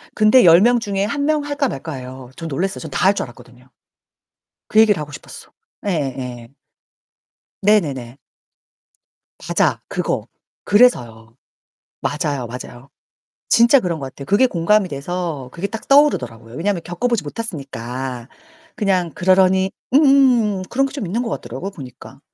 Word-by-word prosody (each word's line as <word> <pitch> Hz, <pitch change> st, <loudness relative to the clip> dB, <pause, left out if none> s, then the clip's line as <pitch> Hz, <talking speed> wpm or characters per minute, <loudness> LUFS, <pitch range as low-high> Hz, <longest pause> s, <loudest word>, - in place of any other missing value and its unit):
근데 215 Hz, +3 st, +5 dB
10 170 Hz, +1 st, +7 dB
명 240 Hz, +2 st, +4 dB
중에 200 Hz, -3 st, -2 dB
1 285 Hz, +6 st, -2 dB
명 305 Hz, -1 st, +1 dB
할까 285 Hz, -1 st, -1 dB
말까예요. 130 Hz, -, -7 dB
전 165 Hz, -, -6 dB
놀랐어요. 180 Hz, +6 st, -2 dB
전 -, -, -8 dB
다 -, -, 0 dB
할 195 Hz, -, +5 dB
줄 -, -, -2 dB
알았거든요. 125 Hz, +1 st, -17 dB, 1.0 s
그 215 Hz, -, +4 dB
얘기를 210 Hz, -5 st, +4 dB
하고 150 Hz, 0 st, -7 dB
싶었어. -, -, -11 dB, 0.4 s
예 -, -, +1 dB
예. 130 Hz, -7 st, -4 dB, 1.1 s
네네네. 140 Hz, -, +1 dB, 1.2 s
맞아, -, -, 0 dB
그거. -, -, -3 dB, 0.4 s
그래서요. 120 Hz, -, +2 dB, 0.7 s
맞아요, 145 Hz, -4 st, -2 dB
맞아요. 125 Hz, +2 st, -10 dB, 0.6 s
진짜 235 Hz, +4 st, +6 dB
그런 175 Hz, -6 st, -2 dB
것 135 Hz, -, -5 dB
같아요. 135 Hz, +1 st, -9 dB
그게 205 Hz, -, +4 dB
공감이 195 Hz, 0 st, +1 dB
돼서 150 Hz, -1 st, -4 dB
그게 175 Hz, +4 st, -3 dB
딱 225 Hz, +2 st, -8 dB
떠오르더라고요. 120 Hz, -, +2 dB
왜냐하면 180 Hz, +2 st, -1 dB
겪어 175 Hz, +8 st, -3 dB
보지 235 Hz, -4 st, 0 dB
못했으니까. 135 Hz, -, -6 dB, 0.5 s
그냥 185 Hz, -5 st, 0 dB
그러려니 190 Hz, +2 st, +3 dB, 0.2 s
음음음음. 260 Hz, -8 st, +4 dB
그런 270 Hz, +2 st, +1 dB
게 275 Hz, -, -8 dB
좀 275 Hz, -8 st, -5 dB
있는 215 Hz, +8 st, -2 dB
것 240 Hz, -, -4 dB
같더라고요, 130 Hz, -, -5 dB
보니까. 135 Hz, -4 st, -12 dB
175 Hz, 315 characters per minute, -19 LUFS, 130-215 Hz, 1.2 s, 10